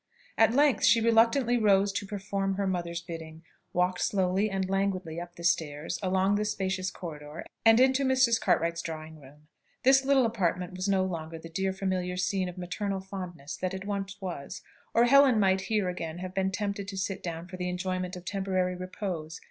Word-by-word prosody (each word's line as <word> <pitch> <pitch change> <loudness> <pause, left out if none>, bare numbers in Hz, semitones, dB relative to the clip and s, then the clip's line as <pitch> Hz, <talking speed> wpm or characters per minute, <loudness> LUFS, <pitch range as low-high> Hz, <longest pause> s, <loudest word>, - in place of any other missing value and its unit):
At 225 +1 +4
length 285 -1 +4
she 215 +3 +6
reluctantly 230 +2 +4
rose 200 -2 +4
to 200 0 -4
perform 195 -1 -2
her 200 0 -1
mother's 170 -2 -2
bidding, 165 -1 -8 0.3
walked 180 +1 0
slowly 190 +1 +1
and 190 -1 -1
languidly 190 -4 -1
up 175 0 -9
the 170 - -10
stairs, 160 -3 0
along 190 +1 +2
the 210 - 0
spacious 190 -2 -1
corridor, 150 -3 -8 0.2
and 225 +1 +6
into 265 +1 +4
Mrs. 260 -3 +3
Cartwright's 170 +1 +1
dressing 160 -2 -7
room. 145 +2 -17 0.4
This 265 +1 +6
little 270 -2 +4
apartment 180 -5 -1
was 185 +2 -2
no 190 -1 +3
longer 165 -3 -5
the 165 +1 -10
dear 190 +3 -1
familiar 185 -1 -2
scene 185 0 0
of 180 - -10
maternal 195 +2 -3
fondness 180 -5 -7
that 185 0 -2
it 190 +1 -6
once 200 -1 -4
was, 175 -8 -6 0.3
or 230 - +6
Helen 265 -2 +6
might 190 -1 +3
here 210 -4 +1
again 170 -2 -4
have 185 0 -6
been 190 0 +1
tempted 200 0 -3
to 195 -1 -6
sit 190 0 -2
down 170 0 -5
for 185 0 -8
the 180 0 -2
enjoyment 185 0 -3
of 180 0 -10
temporary 185 -2 -1
repose. 180 -3 -5
190 Hz, 190 wpm, -29 LUFS, 175-200 Hz, 0.4 s, she